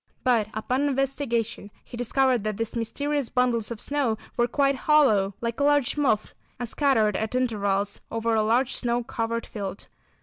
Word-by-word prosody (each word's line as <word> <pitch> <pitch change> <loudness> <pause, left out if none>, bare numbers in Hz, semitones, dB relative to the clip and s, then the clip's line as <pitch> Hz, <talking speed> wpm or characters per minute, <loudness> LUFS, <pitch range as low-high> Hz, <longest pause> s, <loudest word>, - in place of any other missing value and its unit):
But 235 -5 +3
upon 255 +6 0
investigation 260 -6 -1 0.2
he - - -10
discovered 245 0 +1
that 215 -2 -2
these 225 +1 -3
mysterious 285 +4 -1
bundles 245 -4 +1
of 235 -2 -6
snow 275 -6 0 0.2
were 240 - +2
quite 275 +3 +2
hollow, 255 -9 +3
like 235 +1 -3
a - - +2
large 290 -3 +3
muff, 270 -8 +1 0.3
and 245 - -3
scattered 225 -5 +2
at 220 +3 -2
intervals 205 -5 0
over 230 0 -1
a 220 - +3
large 240 +4 +2
snow 240 0 -1
covered 230 -2 -3
field. 200 -2 -6
235 Hz, 165 wpm, -25 LUFS, 220-270 Hz, 0.3 s, But